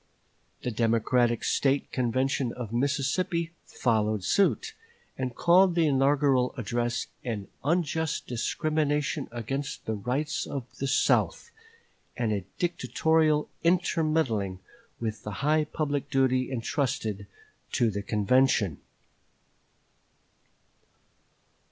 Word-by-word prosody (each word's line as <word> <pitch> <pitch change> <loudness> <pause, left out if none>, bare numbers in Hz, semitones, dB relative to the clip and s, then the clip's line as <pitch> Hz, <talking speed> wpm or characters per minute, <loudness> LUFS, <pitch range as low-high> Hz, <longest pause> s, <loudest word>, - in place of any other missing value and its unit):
The 125 - -1
Democratic 115 +1 +2
State 140 0 +1
Convention 130 +1 0
of 115 -3 -6
Mississippi 145 +6 0 0.2
followed 110 -4 0
suit, 320 - +2 0.4
and 130 -2 -3
called 180 +1 +5
the 170 -2 +3
inaugural 135 -2 +3
address 120 +1 -1 0.2
an 110 -5 -4
unjust 160 0 0
discrimination 150 +3 -1
against 135 +5 -4
the 110 - -1
rights 130 +10 -2
of 135 -4 -4
the 135 - -1
South, 135 - +2 0.7
and 115 -3 0
a 100 -3 -3
dictatorial 160 -3 +1 0.2
intermeddling 155 - +1 0.4
with 110 -1 -3
the 105 +7 -5
high 155 +1 +3
public 145 -2 -2
duty 130 -1 +2
intrusted 115 -5 -2 0.5
to 115 -2 +2
the 100 0 -3
convention. 105 - +2
135 Hz, 95 wpm, -28 LUFS, 115-155 Hz, 0.7 s, called